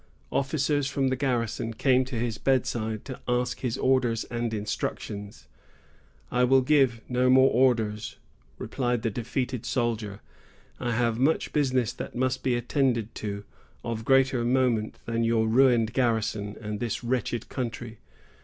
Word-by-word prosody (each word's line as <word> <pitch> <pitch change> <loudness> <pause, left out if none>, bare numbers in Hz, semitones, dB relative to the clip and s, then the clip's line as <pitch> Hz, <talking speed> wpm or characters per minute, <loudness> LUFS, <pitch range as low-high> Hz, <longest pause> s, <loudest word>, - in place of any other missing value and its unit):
Officers 140 0 0
from 135 -1 0
the 130 - +1
garrison 115 -4 -1
came 130 0 +3
to 130 -1 -6
his 115 -1 -2
bedside 110 -5 0
to 130 - -7
ask 125 0 0
his 125 -3 -2
orders 125 -4 +2
and 120 -1 -2
instructions. 105 -1 -4 0.8
"I 125 0 +2
will 130 +1 +5
give 130 -4 +3
no 125 0 +2
more 130 +1 +6
orders," 115 -4 +1 0.4
replied 120 -3 -2
the 115 - 0
defeated 125 +2 -3
soldier; 110 -5 -2 0.6
"I 120 - -1
have 115 0 +1
much 145 +5 +1
business 130 -5 +1
that - - -7
must 130 +1 0
be 125 -2 +1
attended 120 -2 0
to, 100 -1 -5 0.4
of 115 -1 -3
greater 135 -1 +3
moment 120 -3 +1
than 115 0 -1
your 115 -1 +2
ruined 120 -2 +4
garrison 110 -4 0
and 105 -1 -5
this 120 -2 -3
wretched 120 -1 -1
country. 120 -3 -5
120 Hz, 145 wpm, -27 LUFS, 115-130 Hz, 0.8 s, more